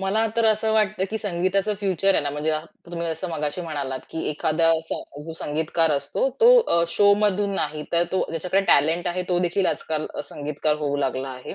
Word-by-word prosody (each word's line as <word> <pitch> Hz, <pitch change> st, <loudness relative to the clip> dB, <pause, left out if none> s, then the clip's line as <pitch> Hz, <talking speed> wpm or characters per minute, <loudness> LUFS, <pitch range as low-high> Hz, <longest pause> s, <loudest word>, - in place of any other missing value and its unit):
मला 205 Hz, +4 st, +1 dB
तर 230 Hz, -, +2 dB
असं 220 Hz, 0 st, +2 dB
वाटतं, 215 Hz, -3 st, +1 dB
की 220 Hz, -, -2 dB
संगीताचं 195 Hz, +1 st, 0 dB
फ्युचर 195 Hz, 0 st, +2 dB
आहे -, -, +2 dB
ना, 145 Hz, -, -2 dB
म्हणजे 150 Hz, +2 st, -2 dB, 0.4 s
तुम्ही 170 Hz, 0 st, -3 dB
जसं 165 Hz, +3 st, -3 dB
मगाशी 150 Hz, +1 st, -2 dB
म्हणालात, 145 Hz, -6 st, -4 dB
की 160 Hz, -, -4 dB
एखादा 155 Hz, +2 st, 0 dB
असा 160 Hz, -, -5 dB, 0.3 s
जो 165 Hz, -, -5 dB
संगीतकार 160 Hz, +1 st, 0 dB
असतो, 140 Hz, -, 0 dB
तो 470 Hz, -, +8 dB
अ, 170 Hz, -, +2 dB
शोमधून 205 Hz, +1 st, +3 dB
नाही 150 Hz, -5 st, -2 dB
तर 170 Hz, 0 st, +3 dB
तो 190 Hz, -, +1 dB
ज्याच्याकडे 180 Hz, +4 st, 0 dB
टॅलेंट 160 Hz, +5 st, +3 dB
आहे 180 Hz, +1 st, -2 dB
तोदेखील 180 Hz, +1 st, +1 dB
आजकाल 155 Hz, -1 st, -2 dB
अ, -, -, -3 dB
संगीतकार 150 Hz, +1 st, -2 dB
होऊ 145 Hz, -1 st, -1 dB
लागला 135 Hz, -1 st, -2 dB
आहे. 130 Hz, -1 st, -8 dB
170 Hz, 185 wpm, -23 LUFS, 150-195 Hz, 0.4 s, तो